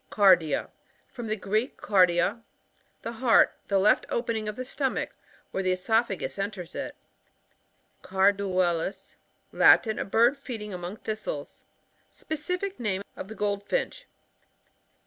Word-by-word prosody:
Cardia. 180 -7 +4 0.2
— - - -37
From 240 -2 -6
the 215 - 0
Greek, 215 +5 -1
kardia, 185 +2 +3 0.6
the 230 - -4
heart 235 0 +4
The 200 - +2
left 200 +3 +3
opening 230 -2 -2
of 210 - -5
the 255 - -5
stomach, 265 0 -2 0.4
where 190 - -1
the 185 -1 +1
oesophagus 200 +1 0
enters 195 -3 -4
it. - - -5 1.1
Carduelis 190 -2 +1 0.2
— - - -43
Latin. 220 -2 +6
A - - -2
bird 235 +7 +3
feeding 220 -7 -6
among 180 +3 -6
thistles. 220 - -6 0.4
Specific 360 +5 -4
name 200 -4 -1
of - - -7
the 220 - -9
Goldfinch. 210 - -2
210 Hz, 125 wpm, -27 LUFS, 190-235 Hz, 1.1 s, Latin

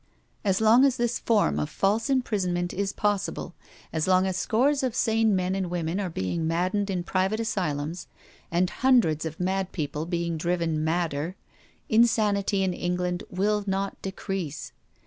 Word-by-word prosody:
As 195 -3 +2
long 220 +4 +6
as 270 -2 +3
this 240 0 0
form 75 - +2
of 75 - -2
false 215 +6 0
imprisonment 190 -9 0
is 195 +1 -1
possible, 205 -3 -2 0.4
as 160 0 0
long 185 0 +4
as 190 -1 -1
scores 265 +9 +2
of 255 -3 -1
sane 225 -3 +2
men 185 0 0
and 190 -2 -2
women 175 +1 -2
are 195 -3 -2
being 160 - -2
maddened 185 +5 0
in 180 -2 -1
private 190 +4 0
asylums, 170 -7 -2 0.4
and 175 +2 +2
hundreds 235 - +3
of 160 0 -5
mad 190 +1 -1
people 155 -1 -3
being 170 -1 -1
driven 165 -2 0
madder, 160 0 -1 0.5
insanity 210 -3 +3
in 185 -1 0
England 180 0 -2
will 205 +3 0
not 195 +1 -2
decrease. 190 -5 -4
185 Hz, 155 wpm, -26 LUFS, 170-210 Hz, 0.5 s, long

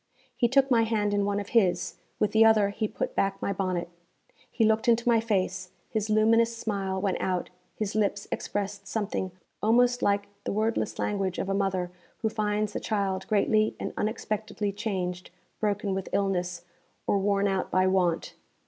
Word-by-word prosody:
He 240 - +3
took 270 +2 +3
my 235 -2 +5
hand 215 -2 +1
in 205 -1 +2
one 205 0 0
of 200 - -6
his; 185 -6 +2 0.2
with 210 - +1
the 220 +1 +6
other 220 -2 +5
he 215 +2 -2
put - - -4
back 195 0 0
my 200 - -1
bonnet. 185 -3 -1 0.6
He 225 - +1
looked 220 +1 +2
into 235 0 +3
my 235 -1 +5
face, 185 -4 -1 0.2
his 215 -1 -1
luminous 230 +2 +3
smile 195 -4 -2
went 190 -1 -1
out, 180 -2 -1 0.2
his 215 -2 -3
lips 205 -1 0
expressed 200 0 -3
something 205 -3 -2 0.3
almost 245 +3 +3
like 200 0 +2 0.2
the - - -2
wordless 220 +2 0
language 195 -3 -1
of 195 - -2
a - - +1
mother 190 -2 0 0.3
who 220 - +3
finds 210 -1 -1
a - - 0
child 195 -3 -1
greatly 215 +1 +2
and - - -4
unexpectedly 215 -1 -2
changed, 185 -4 -3 0.3
broken 205 -2 0
with 190 0 -3
illness, 180 -3 0 0.4
or 200 - +2
worn 200 0 +2
out 190 -1 -1
by 185 0 +3
want. 185 -3 +1
205 Hz, 175 wpm, -28 LUFS, 190-220 Hz, 0.6 s, the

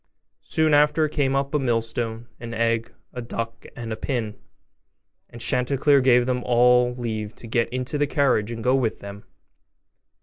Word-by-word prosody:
Soon 160 -1 +1
after 150 +2 +4
came 140 -3 0
up 140 +1 -1
a 150 - +2
millstone, 115 -2 -2
an 115 -1 -7
egg, 115 0 0 0.2
a 125 - -5
duck, 115 -1 -6
and 115 -1 -5
a - - -3
pin; 110 -3 -3 0.9
and 120 - -11
Chanticleer 140 +3 +2
gave 125 -1 +4
them 125 -1 -1
all 125 0 +4
leave 110 -3 -4
to - - -10
get 115 +1 0
into 130 +3 -3
the 145 - +2
carriage 135 -7 +1
and 115 -1 -6
go 125 - +3
with 125 -5 0
them. 100 0 -10
120 Hz, 165 wpm, -23 LUFS, 115-135 Hz, 0.9 s, after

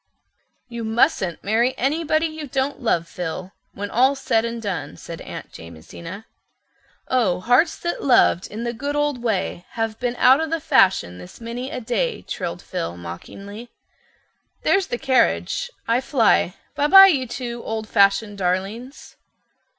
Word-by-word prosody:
"You 235 -1 -6
mustn't 220 -6 +1
marry 235 +5 +1
anybody 310 +4 +1
you 310 -2 -5
don't 270 +2 -2
love, 170 -8 +1
Phil, 180 +2 -5 0.2
when 205 0 -5
all's 265 +4 +3
said 225 0 +1
and 235 0 -4
done," 200 -8 -4
said - - -9
Aunt - - -8
Jamesina. 165 - -10 0.8
"'Oh, 230 -9 +1
hearts 245 - +3
that 345 - -3
loved 245 -8 +4
in 220 +3 -6
the 235 0 -2
good 285 +5 -4
old 295 -4 0
way 200 -6 -2
Have 225 -1 -3
been 245 -1 -2
out 260 +4 +5
o' 320 - -1
the 330 +1 -1
fashion 190 - +2
this 90 0 -12
many 235 +3 -5
a 265 - -5
day.'" 250 - -2
trilled - - -5
Phil 170 - -4
mockingly. 200 - -9 0.9
"There's 390 -1 +2
the 240 - -3
carriage. 270 - +1 0.2
I 230 +2 +2
fly—Bi 265 - +1
bi, 385 +4 +10
you 275 -9 +2
two 240 0 -5
old 220 -1 -4
fashioned 200 0 +2
darlings." 195 +9 -3
235 Hz, 150 wpm, -22 LUFS, 195-270 Hz, 0.9 s, bi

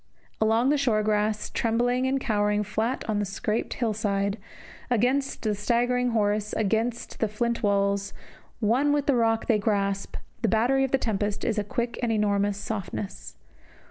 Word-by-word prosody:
Along 225 +4 +3
the 295 0 +2
short 220 -6 +2
grass, 210 0 0
trembling 245 +3 +1
and 270 +1 +1
cowering 210 -4 +1
flat 220 +4 -2
on 215 -2 0
the - - +1
scarped 205 +3 -2
hill 230 -3 0
side, 200 -1 -1 0.5
against 255 +4 +1
the 215 -2 +1
staggering 245 +4 +1
horse, 210 -2 0
against 225 +3 -1
the 220 - +2
flint 235 +3 -1
walls, 200 -1 +1 0.5
one 250 +7 +2
with 290 -1 +1
the 280 - +3
rock 225 -1 +2
they 220 -3 +2
grasp, 200 -1 -1 0.3
the 230 - +2
battery 240 +6 +2
of 270 - 0
the 270 - +3
tempest 210 -4 -2
is 220 -2 0
a - - 0
quick 235 +3 -3
and 240 -2 0
enormous 205 -2 +1
softness. 205 -1 -5
220 Hz, 165 wpm, -26 LUFS, 205-240 Hz, 0.5 s, Along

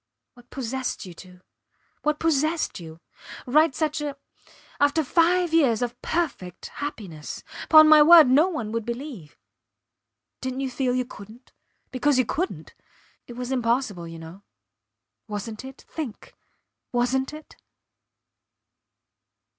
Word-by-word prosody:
What 245 0 -20
possessed 260 -2 -4
you 180 - -10
to?... 180 +1 -15 0.6
What 300 0 0
possessed 315 - 0
you?... 160 -1 -11 0.5
Write 300 +2 +3
such 305 +1 -1
a... 290 -2 -4 0.6
After 290 +3 +3
five 345 +3 +2
years 255 -8 +3
of 245 0 -5
perfect 265 - -3
happiness! 190 - -7 0.3
Pon 310 -1 +9
my 310 -1 +8
word, 325 -1 +9
no 285 +7 +5
one 235 - -4
would 230 0 -2
believe.... 235 - -7 1.0
Didnt 260 0 -4
you 270 -1 -2
feel 250 -1 0
you 255 0 0
couldnt? 225 +1 -14 0.4
Because 275 +1 +1
you 255 - +3
couldnt... 355 +11 -4 0.5
it 240 - -9
was 250 +1 -5
impossible 230 -8 -1
you 165 0 -9
know. 165 +4 -11 0.9
Wasnt 215 +2 -6
it? 265 +1 -11
Think. 290 -9 -7 0.6
Wasnt 255 +2 0
it? 305 0 -12
255 Hz, 125 wpm, -25 LUFS, 225-300 Hz, 1.0 s, Pon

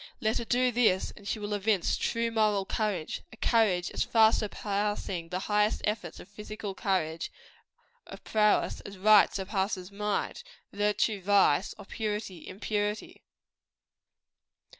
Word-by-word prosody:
Let 220 +1 0
her 235 - -4
do 250 +2 +2
this, 220 -6 +2
and 200 - -12
she 220 - -1
will 210 0 -4
evince 205 -2 +1
true 230 0 -1
moral 210 -3 +2
courage; 200 -7 -2
a 225 - -13
courage 205 -8 +2
as - - -3
far 220 -1 +5
surpassing 205 -4 -2
the 185 +1 -3
highest 210 +1 +1
efforts 210 -6 -3
of - - -11
physical 210 0 -7
courage 170 -5 -1 0.8
of - - -11
prowess, 210 -1 +2
as 200 -1 -10
right 210 +2 +6
surpasses 190 -1 -2
might; 210 - -2 0.3
virtue, 205 0 +1
vice; 195 -3 +3
or 205 - -11
purity, 210 -4 -4
impurity. 210 +2 -3
205 Hz, 135 wpm, -29 LUFS, 190-215 Hz, 0.8 s, right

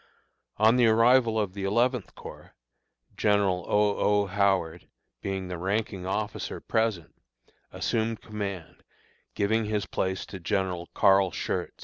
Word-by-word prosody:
On 110 +3 +4
the 120 -2 +5
arrival 115 0 +4
of 100 -4 -2
the 100 -1 -6
Eleventh 120 +3 0
Corps, - - -12 0.6
General 100 -4 +1
O. 105 0 +2
O. 105 0 +2
Howard, 95 -4 0 0.3
being 95 -1 -3
the 90 -2 -5
ranking 95 0 -2
officer 105 +2 -3
present, 110 -7 -1 0.6
assumed 115 -1 -1
command, 100 -5 -6 0.5
giving 110 +2 +1
his 105 -2 -1
place 95 0 -2
to 95 - -9
General 90 -1 -2
Carl 95 -1 +4
Schurz. - - -3
100 Hz, 125 wpm, -27 LUFS, 95-110 Hz, 0.6 s, the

